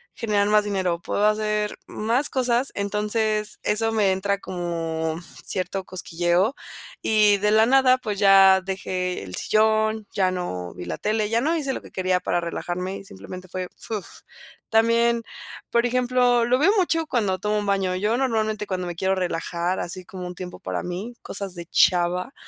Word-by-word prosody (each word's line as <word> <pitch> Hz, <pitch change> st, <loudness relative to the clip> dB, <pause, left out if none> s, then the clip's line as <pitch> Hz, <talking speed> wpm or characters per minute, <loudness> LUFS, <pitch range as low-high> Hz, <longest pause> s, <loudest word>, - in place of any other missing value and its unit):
generar 210 Hz, -3 st, +1 dB
más 210 Hz, 0 st, +4 dB
dinero, 185 Hz, -4 st, -1 dB
puedo 205 Hz, -, 0 dB
hacer 210 Hz, 0 st, 0 dB
más 235 Hz, +7 st, 0 dB
cosas", 250 Hz, 0 st, +1 dB
entonces, 210 Hz, +1 st, 0 dB
eso 225 Hz, +1 st, +1 dB
me 205 Hz, -3 st, +3 dB
entra 200 Hz, +1 st, 0 dB
como 165 Hz, -3 st, -3 dB, 0.3 s
cierto 185 Hz, +1 st, -3 dB
cosquilleo, 175 Hz, +5 st, 0 dB, 0.5 s
y 210 Hz, -2 st, +4 dB
de 210 Hz, +1 st, +1 dB
la 220 Hz, +1 st, +5 dB
nada, 260 Hz, 0 st, +5 dB
pues, 210 Hz, -5 st, -4 dB
ya 195 Hz, -1 st, +7 dB
dejé 185 Hz, -, -3 dB
el 90 Hz, -1 st, -7 dB
sillón, 220 Hz, 0 st, +2 dB
ya 185 Hz, -2 st, +2 dB
no 90 Hz, -, -4 dB
vi 90 Hz, -, -8 dB
la 90 Hz, -, -4 dB
tele, 215 Hz, 0 st, 0 dB
ya 230 Hz, +1 st, +2 dB
no 320 Hz, +6 st, +1 dB
hice 280 Hz, -4 st, -1 dB
lo -, -, -4 dB
quería 185 Hz, -1 st, -1 dB
para 175 Hz, 0 st, -1 dB
relajarme 180 Hz, +3 st, -4 dB
y 195 Hz, -, -11 dB
simplemente 180 Hz, -, -10 dB
fue, 185 Hz, 0 st, -5 dB
fuf, 210 Hz, -5 st, -5 dB, 0.6 s
también, 230 Hz, +1 st, +3 dB, 0.5 s
por 235 Hz, 0 st, +3 dB
ejemplo, 245 Hz, -1 st, +2 dB
lo 250 Hz, +2 st, +2 dB
veo 365 Hz, +7 st, +5 dB
mucho 330 Hz, -3 st, +2 dB
cuando 205 Hz, -9 st, 0 dB
tomo 210 Hz, 0 st, 0 dB
un 205 Hz, -, -2 dB
baño, 195 Hz, -2 st, 0 dB
yo 210 Hz, +5 st, 0 dB
normalmente 220 Hz, -5 st, -1 dB
cuando 185 Hz, -2 st, -3 dB
me 175 Hz, -, -5 dB
quiero 190 Hz, +2 st, 0 dB
relajar, 175 Hz, 0 st, -2 dB
así 185 Hz, +2 st, -5 dB
como 180 Hz, -1 st, -7 dB
un 180 Hz, -, -7 dB
tiempo 180 Hz, -1 st, -8 dB
para -, -, -4 dB
mí, 190 Hz, +7 st, -5 dB
cosas 195 Hz, -3 st, -4 dB
de 170 Hz, 0 st, -6 dB
chava, 180 Hz, +8 st, +2 dB
200 Hz, 170 wpm, -24 LUFS, 180-225 Hz, 0.6 s, ya